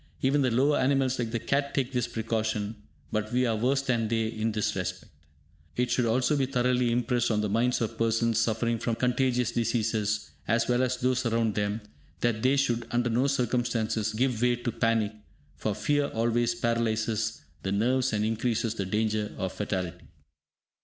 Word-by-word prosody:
Even 140 +2 +3
the 130 - +3
lower 135 +5 +3
animals 130 -1 +2
like 120 -2 -1
the 115 - -1
cat 140 +5 -1
take 130 -3 0
this 125 -3 0
precaution, 110 -1 -2 0.4
but 110 0 -2
we 125 +1 +2
are 115 -2 +1
worse 130 +5 +1
than 120 -4 0
they 115 0 0
in 110 0 -1
this 105 -1 -1
respect. - - -4 0.6
It 125 0 0
should 125 -1 +2
also 125 +6 +2
be 135 -2 +1
thoroughly 125 -2 +1
impressed 120 0 +1
on 105 -2 +1
the 105 - -1
minds 120 +4 +1
of 115 0 -3
persons 115 0 +2
suffering 115 +1 0
from 115 0 -1
contagious 125 -1 +1
diseases, 110 -5 0 0.2
as 115 +2 +2
well 125 0 +2
as 130 0 0
those 125 0 +1
around 115 -1 +1
them, 105 +2 -1 0.4
that 115 -2 +1
they 130 +3 +3
should, 120 -4 0
under 120 0 0
no 125 +4 +2
circumstances, 120 -5 0
give 120 0 0
way 125 0 +3
to 120 0 -3
panic, 115 -2 +1 0.4
for 100 +8 -2
fear 145 +7 +1
always 115 +1 +1
paralyses 110 -2 -1 0.2
the 95 - -2
nerves 125 +6 +2
and 105 -1 0
increases 115 0 0
the 100 -4 -3
danger 105 +1 0
of 95 -1 -3
fatality. 95 -4 -4
115 Hz, 180 wpm, -28 LUFS, 110-125 Hz, 0.6 s, Even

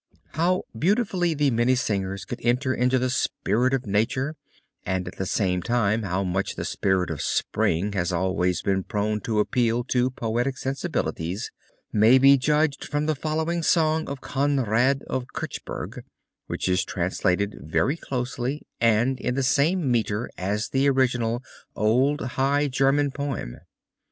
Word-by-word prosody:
How 180 +3 +1
beautifully 180 - +1
the 145 -2 +2
Minnesingers 115 -6 0
could 120 - -6
enter 125 +3 +1
into 125 +1 +2
the 130 0 0
spirit 125 -1 0
of 135 -2 -1
nature 115 +8 0 0.5
and 95 -1 -2
at - - -8
the 95 - -2
same 90 -3 0
time 115 0 +1
how 95 -1 -1
much 95 +1 -2
the - - -4
spirit 95 -3 0
of 75 - -4
Spring 100 +6 0
has 90 -2 0
always 90 0 0
been 95 -1 +1
prone 105 +2 -2
to 110 -4 -1
appeal 120 +2 +1
to 125 0 +2
poetic 120 +2 -2
sensibilities 110 -9 -3 0.4
may 110 +5 +6
be 135 +1 +7
judged 150 +2 +1
from 145 0 -2
the 155 - +1
following 160 +3 -1
song 160 -1 +2
of 140 -1 -6
Conrad 135 -1 +1
of 130 -1 -3
Kirchberg, - - -5 0.5
which - - -3
is 90 0 +2
translated 90 0 -1
very 80 - 0
closely 125 -1 -3
and 115 +3 +2
in 125 0 -2
the 135 - 0
same 145 +3 +2
meter 115 -1 0
as 105 +4 -2
the 135 +1 +2
original 125 -3 +1 0.3
old 130 +7 +2
high 135 +3 +1
German 135 +2 +2
poem. 140 - -4
125 Hz, 145 wpm, -25 LUFS, 105-140 Hz, 0.5 s, be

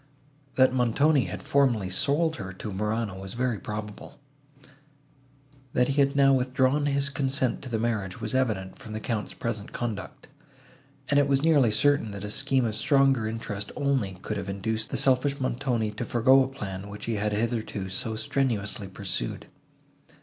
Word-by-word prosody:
That 130 -1 +5
Montoni 130 +4 +3
had - - -6
formerly 120 -9 +2
sold 150 - +1
her 95 -4 -6
to 105 +3 -6
Morano, 105 0 -2
was 95 +2 -7
very 120 -3 0
probable; 105 -1 -7 1.5
that 125 +1 +2
he 140 +1 +3
had 140 +1 +2
now 135 -1 +5
withdrawn 130 +2 +2
his 140 0 +1
consent 135 -2 0
to 130 - -7
the 115 - 0
marriage, 110 -4 -2
was 110 0 -4
evident 110 -8 -1
from 110 - -9
the 110 - -3
Count's 110 -1 -3
present 110 -3 -4
conduct; 110 -4 -5 0.8
and 145 - +4
it 140 - +3
was 140 0 +2
nearly 145 -7 +5
certain, 140 +2 +2
that 100 0 -6
a 105 - -4
scheme 135 0 +1
of 110 - -1
stronger 135 0 +3
interest 105 -2 -4
only 130 -10 0
could 105 - -3
have 100 0 -5
induced 110 +3 -2
the - - -2
selfish 135 +1 +2
Montoni 120 -4 -1
to 105 +3 -5
forego 130 +3 +5
a - - -2
plan, 100 -7 -6
which 105 +1 -7
he 115 -2 -1
had 105 +1 0
hitherto 110 -3 -2
so 110 +4 -3
strenuously 110 -4 -1
pursued. 95 -10 -4
115 Hz, 170 wpm, -27 LUFS, 105-135 Hz, 1.5 s, That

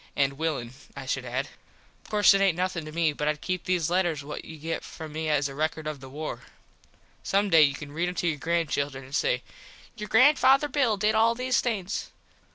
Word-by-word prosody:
And 140 -1 +2
willin, 140 -5 -3 0.2
I 135 - -6
should 130 -1 -2
add. 130 +3 -2 0.6
Of - - -17
course 210 -1 +5
it 195 - +2
aint 190 -4 +3
nothin 180 -3 -2
to 155 - -8
me 160 -1 +1
but 150 +1 -3
Id 150 0 0
keep 185 +1 -3
these 175 -3 0
letters 175 -5 +1
what 150 +1 -7
you 160 - -10
get 160 +2 -4
from 155 -1 -9
me 155 0 -2
as 145 -2 +2
a 135 - -8
record 155 +2 -2
of 155 -2 -4
the 135 0 -11
war. 150 +3 -5 0.8
Some 200 0 +1
day 160 - +7
you 140 -2 +4
can 145 0 -9
read 170 +4 -1
em 180 - -6
to 175 - -1
your 155 -3 -1
granchildren 145 -4 -1
an 130 +1 -14
say - - +1 0.5
"Your 210 -2 -7
Granfather 270 +3 +5
Bill 255 -7 +2
did 210 +2 +2
all 225 +1 +3
these 255 +1 +1
things." 210 -5 -3
160 Hz, 220 wpm, -27 LUFS, 145-195 Hz, 0.8 s, day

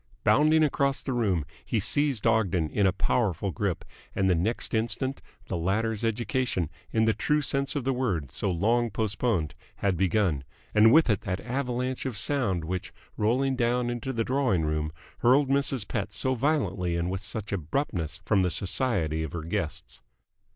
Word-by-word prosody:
Bounding 155 +2 +4
across 140 -2 +1
the 135 - -2
room, 100 -10 +1 0.2
he 115 - -1
seized 140 +1 +1
Ogden 95 -9 +2
in 100 -2 +2
a - - +3
powerful 100 -1 0
grip, 100 -6 -2 0.3
and 95 - +2
the 95 - +4
next 95 +8 -1
instant 125 +4 0 0.3
the - - -3
latter's 105 +6 0
education, 115 - -1 0.2
in 110 0 +2
the 110 - +3
true 150 +8 +1
sense 140 +1 0
of 145 - -1
the 135 +1 +1
word, 95 - -1
so 100 - -1
long 115 +7 +1
postponed, 105 -5 -1 0.2
had 95 -3 0
begun; 90 -6 +1 0.3
and 110 +1 +6
with 160 +4 +6
it 105 -5 +1
that 95 0 -3
avalanche 125 0 -2
of 120 -5 -4
sound 105 - 0
which, 90 +2 -4 0.2
rolling 130 +5 +1
down 120 0 +1
into 120 +2 -3
the 115 -3 -1
drawing 130 - +1
room, 75 0 -1 0.3
hurled 130 +3 +4
Mrs. 135 -5 +2
Pett 100 -2 -3
so 130 +5 +1
violently 105 - 0
and 85 +1 -1
with 95 0 -3
such 105 0 -5
abruptness 85 - -2
from 105 -3 +3
the 90 - +2
society 90 - 0
of 80 -3 -5
her 85 -2 -4
guests. 85 -1 -4
110 Hz, 170 wpm, -27 LUFS, 90-130 Hz, 0.3 s, and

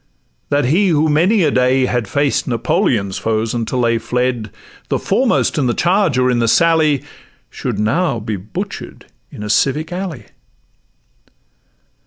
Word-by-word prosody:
that 145 -1 +1
he 175 +10 +2
who 160 -3 +2
many 175 +7 +3
a 150 - +2
day 130 +1 +2
Had 120 -4 -1
faced 145 +5 0
Napoleon's 120 - 0
foes 110 0 -1
until 120 +2 -2
they 115 -1 +1
fled,— 125 -1 -2 0.4
The - - +1
foremost - - +1
in 135 - +1
the 120 - 0
charge 175 -5 +2
or 125 0 +2
in 120 - +1
the 115 - +1
sally, 155 -1 +3 0.5
Should - - -4
now 120 +5 0
be 110 0 -4
butcher'd 100 +3 -7 0.3
in 105 - -8
a 105 - -5
civic 150 +7 +1
alley. 175 - -5
130 Hz, 150 wpm, -17 LUFS, 115-160 Hz, 0.5 s, many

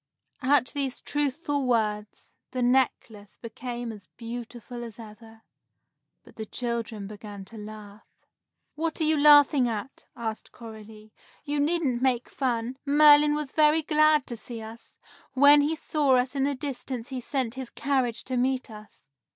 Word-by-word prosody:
At 260 -1 +3
these 275 -3 -3
truthful 290 -1 -2
words, 215 -3 -1 0.2
the 255 -1 -2
necklace 240 -5 0
became 240 0 -6
as 205 -4 -12
beautiful 240 +1 -7
as 230 -3 -9
ever. 225 0 -13 0.8
But - - -19
the 220 - -5
children 235 -3 -4
began 205 -1 -9
to 225 +4 -12
laugh. 210 0 -11 0.7
"What 320 +2 -3
are - - +1
you 310 0 +3
laughing 290 -3 +6
at?" 225 +4 -6
asked 220 -2 -5
Coralie. 220 -1 -12 0.3
"You 290 0 -1
needn't 290 -5 0
make 255 -2 +1
fun. 245 -1 -2
Merlin 295 0 +6
was 300 -3 -4
very 310 +1 +3
glad 305 -1 +3
to 240 - -5
see 230 +1 -7
us. 225 +1 -11 0.4
When 285 +2 +7
he 300 +3 0
saw 295 -3 +1
us 255 +3 -1
in 270 -1 +1
the 285 0 -1
distance 255 -3 -5
he 260 -2 -5
sent 255 -2 -2
his 260 -2 -7
carriage 260 -4 -1
to 255 -1 -3
meet 255 -1 -1
us. 215 0 -14
250 Hz, 150 wpm, -26 LUFS, 225-285 Hz, 0.8 s, When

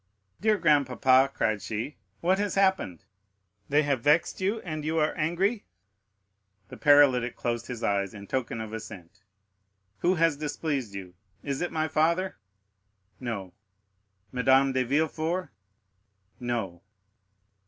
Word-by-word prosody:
"Dear 215 0 +3
grandpapa," 135 -4 +4
cried 110 -6 0
she, 110 +9 -4 0.3
"what 185 +3 +2
has 205 -1 -1
happened? 190 - +1 0.6
They 150 +2 +4
have 140 -4 0
vexed 150 +7 +2
you, 200 +4 0
and 155 -3 -5
you 160 +2 -1
are 155 -1 +2
angry?" 180 +7 0 1.1
The - - -10
paralytic 135 -4 +5
closed 120 -1 -3
his 120 -2 -6
eyes 100 -1 0
in 100 -1 -9
token 115 0 -3
of 110 0 -7
assent. 100 -3 -9 0.8
"Who 180 +2 +2
has 165 -3 +2
displeased 145 -7 -3
you? 95 -2 -8 0.3
Is 140 -2 -3
it 175 - -2
my 155 -1 0
father?" 170 +3 +1 0.8
"No." 105 -7 -5 0.8
"Madame 135 +2 +4
de 130 0 +1
Villefort?" 160 +5 -1 0.9
"No." 115 -8 -3
140 Hz, 125 wpm, -27 LUFS, 115-165 Hz, 1.1 s, paralytic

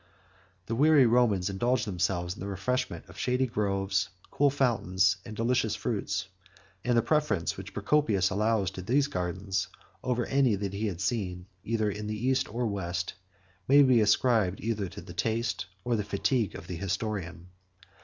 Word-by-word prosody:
The 115 - -3
weary 145 +2 +5
Romans 115 -6 +3
indulged 120 +7 +1
themselves 90 -2 -1
in - - -14
the 100 - -5
refreshment 100 +7 -2
of - - -12
shady 125 +1 +1
groves, 100 -4 0 0.2
cool 145 0 +3
fountains, 95 -8 +2
and 110 - -7
delicious 115 -1 +1
fruits; 95 -4 -2 0.6
and 120 -1 +2
the 115 - +4
preference 150 - +1
which 95 +2 -8
Procopius 100 -4 +2
allows 105 -1 +1
to 95 - -7
these 130 +9 +2
gardens 95 -5 -2 0.4
over 125 -2 0
any 135 -5 +3
that 100 0 -4
he 105 +2 -1
had 90 -3 -4
seen, 95 -3 -2 0.2
either 110 -2 0
in 105 +1 -5
the 105 0 -3
East 130 +2 0
or 120 +2 -1
West, 90 -4 -2 0.5
may 140 +2 +7
be 130 -4 +5
ascribed 105 -3 +3
either 105 -3 -2
to - - -9
the - - -10
taste, 115 -3 -1 0.2
or 120 -1 +1
the 105 - -1
fatigue, 105 +2 0
of - - -8
the 90 -2 -5
historian. 95 -2 -3
105 Hz, 165 wpm, -29 LUFS, 95-120 Hz, 0.6 s, may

